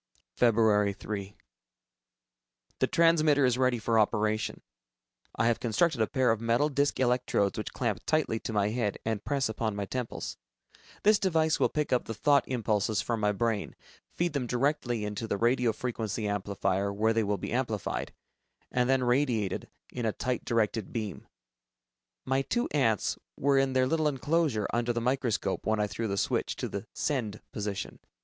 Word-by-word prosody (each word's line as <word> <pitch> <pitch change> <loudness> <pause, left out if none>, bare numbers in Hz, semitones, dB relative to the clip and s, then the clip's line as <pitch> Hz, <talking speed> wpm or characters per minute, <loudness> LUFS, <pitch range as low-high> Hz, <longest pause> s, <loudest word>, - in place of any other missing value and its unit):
Feb. 105 -4 +3
3. 100 -1 -6 1.4
The - - +3
transmitter 155 -4 +4
is 125 0 +1
ready 130 -2 +3
for 115 0 +1
operation. 110 0 0 0.7
I 110 - +1
have 115 -1 +2
constructed 125 +3 +1
a 110 - +3
pair 130 -3 +2
of 110 -1 -1
metal 115 +6 +2
disc 140 -1 0
electrodes 125 -5 +1
which 110 - -4
clamp 110 -7 -1
tightly 155 -8 +1
to - - -5
my 105 -1 +1
head 110 -3 -1
and 110 -2 -2
press 140 -2 0
upon 110 -1 -2
my 100 0 -2
temples. 125 +3 -4 0.7
This 210 0 +5
device 160 -4 +2
will - - +3
pick 150 -3 -1
up 125 - +1
the 115 - -5
thought 140 +5 +3
impulses 110 -4 0
from 115 +3 -1
my 105 -1 +2
brain, 110 0 -1 0.4
feed 175 -2 0
them 135 -4 -1
directly 120 -3 0
into 105 +2 -4
the 100 - -1
radio 120 +1 +2
frequency 110 -2 -3
amplifier, 100 -1 -1
where 110 +3 +1
they 115 0 +2
will 100 0 0
be - - -5
amplified, 120 -5 -2 0.6
and 125 0 +1
then 135 -1 +3
radiated 120 -6 0 0.2
in 120 -2 -2
a - - +2
tight 125 +2 -2
directed 110 -2 0
beam. 110 -4 -5 1.0
My 135 +1 +1
two 240 - -1
ants 115 -9 +1 0.2
were 140 0 +3
in 135 -1 +1
their 130 0 +3
little 155 +3 +1
enclosure 145 -5 +1
under 120 0 +1
the 120 - -1
microscope 120 -5 -1
when 110 0 +2
I 105 - +2
threw 110 +2 -3
the 100 -1 -2
switch - - 0
to - - -3
the - - -6
"send" 110 -8 -2
position. 105 -2 -4
115 Hz, 170 wpm, -29 LUFS, 105-130 Hz, 1.4 s, This